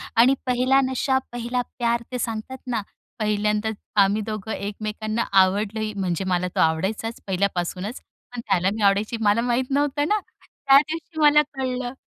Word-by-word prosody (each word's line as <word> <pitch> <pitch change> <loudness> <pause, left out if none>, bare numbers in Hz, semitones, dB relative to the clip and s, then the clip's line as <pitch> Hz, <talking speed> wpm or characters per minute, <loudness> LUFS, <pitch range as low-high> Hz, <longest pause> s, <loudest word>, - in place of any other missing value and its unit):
आणि 245 +4 +6
पेहला 255 +1 +3
नशा 265 +1 +1
पेहला 245 +1 -2 0.2
प्यार 235 -1 +1
ते 250 - -3
सांगतात 230 +2 -4
ना. 235 -3 -1 0.4
पहिल्यांदाच 210 0 0 0.3
आम्ही 200 +2 +1
दोघं 215 0 -5
एकमेकांना 215 +2 -3 0.2
आवडलोही 210 +3 0
म्हणजे 190 -3 -2
मला 180 -1 +1
तो - - 0
आवडायचाच 190 +8 0
पहिल्यापासूनच. 190 +3 -2 0.3
पण 245 - -6
त्याला 190 -2 +2
मी 220 - -5
आवडायची 205 +3 +2
मला 210 +1 +3
माहीत 245 +2 0
नव्हतं 290 +1 +1
ना. 425 +4 +2 0.2
त्या 275 -1 +3
दिवशी 315 +2 -5
मला 300 0 +6
कळलं. 255 -2 -3
220 Hz, 150 wpm, -23 LUFS, 205-255 Hz, 0.4 s, आणि